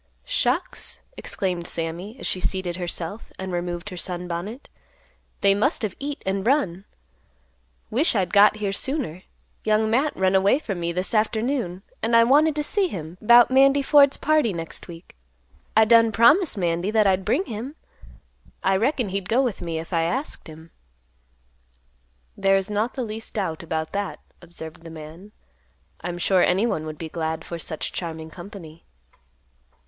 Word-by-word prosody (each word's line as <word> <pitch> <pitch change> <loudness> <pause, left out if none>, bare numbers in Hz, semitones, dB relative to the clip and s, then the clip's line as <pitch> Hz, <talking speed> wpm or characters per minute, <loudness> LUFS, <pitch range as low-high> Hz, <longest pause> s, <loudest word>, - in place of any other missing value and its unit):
"Shucks!" - - -1 0.2
exclaimed 180 -3 -2
Sammy, 170 +8 -4
as - - -7
she 185 - -1
seated 185 -2 -2
herself, 175 +3 -5
and 190 0 -5
removed 175 +2 -3
her 180 - -7
sunbonnet; 180 - -4 0.7
"they 200 0 +5
must've 215 - 0
eat 285 0 -5
and 195 +2 -1
run. 200 - +1 1.1
Wish'd 255 +5 +2
I'd 190 -3 0
got 205 +1 +7
here 210 -2 -2
sooner. 235 - -3 0.4
Young 215 0 +2
Matt 275 +6 +1
run 190 0 +2
away 195 +6 +4
from 205 - -5
me 170 0 -1
this 180 +5 -2
afternoon. 220 -3 0 0.2
And 230 +1 +1
I 230 - +8
wanted 295 +5 +4
to 300 - -1
see 395 +5 +1
him 170 - -7
'bout 240 +3 +7
Mandy 275 +1 +5
Ford's 280 0 +5
party 305 -8 +2
next 165 -1 -5
week. 170 0 -12 0.6
I 220 - +7
done 230 0 +5
promised 295 - +4
Mandy 175 +1 0
that 215 -1 +3
I'd 190 -1 +2
bring 370 - +1
him. 240 +6 -6 0.9
I 190 0 +3
reckon 245 0 0
he'd 195 -1 -3
go 250 +4 +3
with 240 -6 -2
me 165 -2 -3
if 165 +3 -6
I 165 - +2
asked 255 - -2
him." 160 +1 -12 1.6
"There 195 0 +3
is 195 +2 -2
not 215 +4 -1
the 260 - -2
least 220 0 -7
doubt 175 -7 -2
about 160 -1 -3
that," 200 0 -3 0.2
observed 170 -1 -10
the 165 - -9
man; 160 +5 -11 0.7
"I'm 175 0 -4
sure 185 +1 +3
anyone 180 -5 +1
would 155 -1 -6
be 160 - -5
glad 160 0 -3
for 170 - -6
such 155 -1 -5
charming 160 -2 -5
company." 175 -3 -11
195 Hz, 160 wpm, -24 LUFS, 170-230 Hz, 1.6 s, I